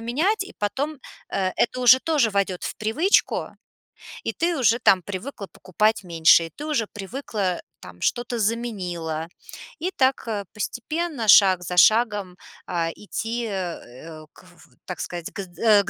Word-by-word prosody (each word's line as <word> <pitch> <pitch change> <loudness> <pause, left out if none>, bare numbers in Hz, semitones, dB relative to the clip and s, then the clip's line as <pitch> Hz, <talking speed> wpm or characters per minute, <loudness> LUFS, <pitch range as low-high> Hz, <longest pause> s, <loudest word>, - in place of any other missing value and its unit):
менять, 315 - 0
и 385 - -11
потом, 275 +8 -2 0.3
э, 190 -1 -1
это 250 +1 0
уже 250 +1 +7
тоже 290 -8 +2
войдет 195 -3 -1
в - - -4
привычку, 265 - +1 0.7
и - - -2
ты 340 0 0
уже 235 -2 +3
там 195 -5 +4
привыкла 200 +3 -7
покупать 215 +5 0
меньше, 165 -1 +5
и - - -13
ты 295 - -8
уже 295 -8 0
привыкла 205 -3 -4 0.2
там, 90 -1 -13
что-то 240 0 -1
заменила, 185 -8 -2 0.5
и 360 +4 -2
так 265 -7 +1 0.3
постепенно, 275 +4 -3
шаг 185 -2 +7
за 180 +1 -5
шагом, 205 -3 +4 0.3
а-а, 170 -2 -1
идти, 230 +3 -4
э-э, 165 - -7
к - - -18
в 175 -2 -20
в - - -31
так 180 - -6
сказать, 175 -2 -5
к - - -9
з 190 - -9
э, 215 -3 +5
к 190 - -6
210 Hz, 160 wpm, -23 LUFS, 180-245 Hz, 0.7 s, уже